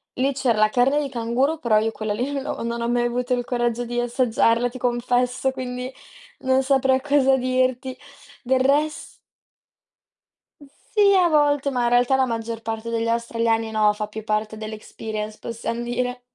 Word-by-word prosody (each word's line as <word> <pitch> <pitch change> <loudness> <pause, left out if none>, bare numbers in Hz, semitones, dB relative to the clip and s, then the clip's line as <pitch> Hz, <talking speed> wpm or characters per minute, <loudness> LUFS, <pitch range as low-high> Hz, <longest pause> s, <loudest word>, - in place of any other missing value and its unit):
lì 270 +2 +1
c'era 250 -5 +1
la 215 0 +4
carne 260 +5 +2
di 280 - -3
canguro, 255 +6 0
però 220 -5 +2
io 220 +1 +1
quella 215 -1 -3
lì 250 +6 -2
non 275 -1 -2
l'ho 285 - -4
non 235 0 -3
ho 235 - -1
mai 240 0 +1
avuto 245 +1 -1
il 245 - -2
coraggio 240 -1 -1
di 240 +1 -2
assaggiarla, 240 -1 +2
ti 255 - -10
confesso, 245 +1 0
quindi 255 0 -5 0.5
non 260 -1 +2
saprei 265 -1 +2
cosa 275 -2 +3
dirti. 255 0 0 0.5
Del 260 +1 +2
res 295 +3 0 1.5
Sì, 400 +8 +1
a 360 -2 +5
volte, 290 -2 +2
ma 250 -2 0
in - - +2
realtà 245 +2 +3
la 265 0 +3
maggior 230 -1 -4
parte 225 0 -4
degli 230 0 -1
australiani 230 -1 0
no, 215 -1 +3
fa 210 0 -4
più 215 0 -8
parte 215 0 -1
dell' 215 0 -6
experience, 215 0 -6
possiam 230 0 -4
dire. 250 +1 -2
245 Hz, 175 wpm, -23 LUFS, 230-265 Hz, 1.5 s, a